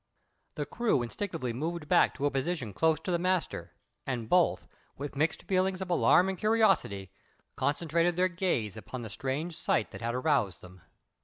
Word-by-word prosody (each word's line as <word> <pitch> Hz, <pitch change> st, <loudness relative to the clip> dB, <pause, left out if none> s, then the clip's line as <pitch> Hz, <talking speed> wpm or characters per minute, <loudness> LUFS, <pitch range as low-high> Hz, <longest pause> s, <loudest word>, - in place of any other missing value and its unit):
The -, -, -2 dB
crew 230 Hz, -, +1 dB
instinctively 130 Hz, -, -3 dB
moved 160 Hz, +4 st, -3 dB
back -, -, +4 dB
to 145 Hz, -, -2 dB
a 145 Hz, -, +2 dB
position 135 Hz, -, -2 dB
close 160 Hz, -, +2 dB
to 185 Hz, -, -3 dB
the 170 Hz, -, +1 dB
master, 175 Hz, -, -1 dB, 0.3 s
and 120 Hz, -4 st, -2 dB
both, 180 Hz, +3 st, +2 dB, 0.3 s
with 145 Hz, +1 st, -6 dB
mixed 155 Hz, +3 st, 0 dB
feelings 185 Hz, 0 st, +1 dB
of 190 Hz, -1 st, -4 dB
alarm 180 Hz, +1 st, +5 dB
and 190 Hz, -1 st, -3 dB
curiosity, 195 Hz, -, +2 dB, 0.4 s
concentrated 170 Hz, +3 st, +1 dB
their 180 Hz, +1 st, +3 dB
gaze 170 Hz, -, -1 dB
upon 120 Hz, +5 st, -7 dB
the 110 Hz, -, -7 dB
strange 145 Hz, -, -3 dB
sight 110 Hz, -, 0 dB
that -, -, -9 dB
had 120 Hz, +1 st, -2 dB
aroused 125 Hz, -, +1 dB
them. 90 Hz, 0 st, -14 dB
155 Hz, 170 wpm, -30 LUFS, 120-180 Hz, 0.4 s, alarm